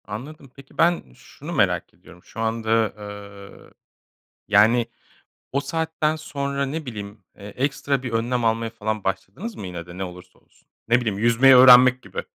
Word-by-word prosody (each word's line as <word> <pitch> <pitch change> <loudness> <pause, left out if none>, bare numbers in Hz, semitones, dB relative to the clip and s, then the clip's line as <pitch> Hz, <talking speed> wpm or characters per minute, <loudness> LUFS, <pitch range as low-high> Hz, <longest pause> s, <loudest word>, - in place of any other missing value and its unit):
Anladım. 135 +6 -9
Peki, 140 -1 -17
ben 170 +1 +3
şunu - - -10
merak - - 0
ediyorum. 90 +1 -18
Şu - - -12
anda, 115 -1 0
eee, 100 -1 -11 0.8
yani, 110 +3 +4 0.7
o 140 - 0
saatten 160 +1 -1
sonra, 140 -3 -3
ne 155 +3 -5
bileyim, 105 -3 -8
eee, - - -14
ekstra 135 +3 -2
bir 125 - -4
önlem 120 +1 -1
almaya 115 0 0
falan 110 -2 -4
başladınız 95 - -4
mı 95 - -7
yine 85 -2 -7
de, 90 +1 -12
ne 95 - -3
olursa 90 0 -11
olsun? - - -32 0.2
Ne 120 +2 +3
bileyim, 110 -5 -2
yüzmeyi 120 +4 +5
öğrenmek 125 0 +8
gibi - - -6
115 Hz, 160 wpm, -23 LUFS, 105-135 Hz, 0.8 s, öğrenmek